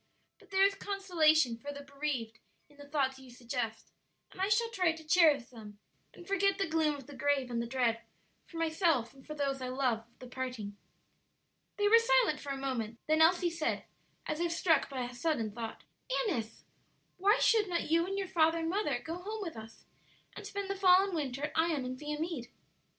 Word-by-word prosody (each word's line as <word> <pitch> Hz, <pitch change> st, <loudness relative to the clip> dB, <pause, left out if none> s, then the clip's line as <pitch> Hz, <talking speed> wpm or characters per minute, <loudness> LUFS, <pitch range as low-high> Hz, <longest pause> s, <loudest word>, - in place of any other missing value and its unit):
But -, -, -20 dB
there 385 Hz, -1 st, +3 dB
is 395 Hz, -, +3 dB
consolation 320 Hz, -, +2 dB
for 285 Hz, +5 st, -7 dB
the 285 Hz, 0 st, -8 dB
bereaved 275 Hz, -6 st, -4 dB, 0.3 s
in 290 Hz, -, -22 dB
the 285 Hz, 0 st, -12 dB
thoughts 265 Hz, -3 st, 0 dB
you 260 Hz, -1 st, -14 dB
suggest; 240 Hz, -2 st, -5 dB, 0.4 s
and 375 Hz, -, -8 dB
I 390 Hz, -, +2 dB
shall 460 Hz, +2 st, +2 dB
try 365 Hz, -7 st, +2 dB
to 320 Hz, 0 st, -11 dB
cherish 310 Hz, -6 st, +5 dB
them 215 Hz, -4 st, -11 dB, 0.4 s
and 350 Hz, -, -13 dB
forget 395 Hz, 0 st, +2 dB
the 395 Hz, -, +1 dB
gloom 315 Hz, -2 st, +1 dB
of 275 Hz, -3 st, -10 dB
the 285 Hz, +1 st, -11 dB
grave 275 Hz, -3 st, 0 dB
and 235 Hz, -1 st, -1 dB
the 235 Hz, -, -4 dB
dread, 235 Hz, -2 st, 0 dB, 0.5 s
for 335 Hz, -, -10 dB
myself 320 Hz, -, +1 dB
and 270 Hz, -1 st, -17 dB
for 305 Hz, -, -6 dB
those 275 Hz, -2 st, -1 dB
I 255 Hz, -, -3 dB
love, 255 Hz, -3 st, 0 dB
of 235 Hz, -, -33 dB
the 255 Hz, -, -11 dB
parting." 250 Hz, -5 st, -5 dB, 1.0 s
They 410 Hz, 0 st, +3 dB
were 460 Hz, +2 st, +8 dB
silent 460 Hz, -9 st, +3 dB
for 285 Hz, -, -8 dB
a 275 Hz, -, -3 dB
moment; 240 Hz, -5 st, -3 dB
then 310 Hz, +1 st, +3 dB
Elsie 345 Hz, +1 st, +4 dB
said, 330 Hz, -2 st, -2 dB, 0.4 s
as 305 Hz, -, -3 dB
if 340 Hz, 0 st, 0 dB
struck 335 Hz, -1 st, +2 dB
by 260 Hz, -3 st, -3 dB
a 245 Hz, 0 st, -6 dB
sudden 245 Hz, -4 st, -1 dB
thought, 225 Hz, +1 st, -7 dB, 0.4 s
"Annis, 230 Hz, -, -3 dB, 0.5 s
why 405 Hz, +5 st, +4 dB
should 430 Hz, -4 st, +3 dB
not 340 Hz, -3 st, -2 dB
you 335 Hz, +2 st, +3 dB
and 390 Hz, +1 st, -3 dB
your 390 Hz, -1 st, -2 dB
father 330 Hz, -2 st, +3 dB
and 325 Hz, 0 st, -2 dB
mother 410 Hz, +3 st, 0 dB
go 330 Hz, +2 st, -4 dB
home 425 Hz, +2 st, -5 dB
with 335 Hz, -, -6 dB
us 225 Hz, 0 st, -11 dB, 0.5 s
and -, -, -7 dB
spend 400 Hz, -1 st, -4 dB
the 395 Hz, -, -2 dB
fall 375 Hz, -1 st, +6 dB
and 395 Hz, -1 st, -3 dB
winter 280 Hz, -4 st, -3 dB
at 300 Hz, -, -1 dB
Ion 320 Hz, -5 st, +1 dB
and 255 Hz, 0 st, -4 dB
Viamede?" 300 Hz, -3 st, -4 dB
305 Hz, 205 wpm, -32 LUFS, 255-360 Hz, 1.0 s, were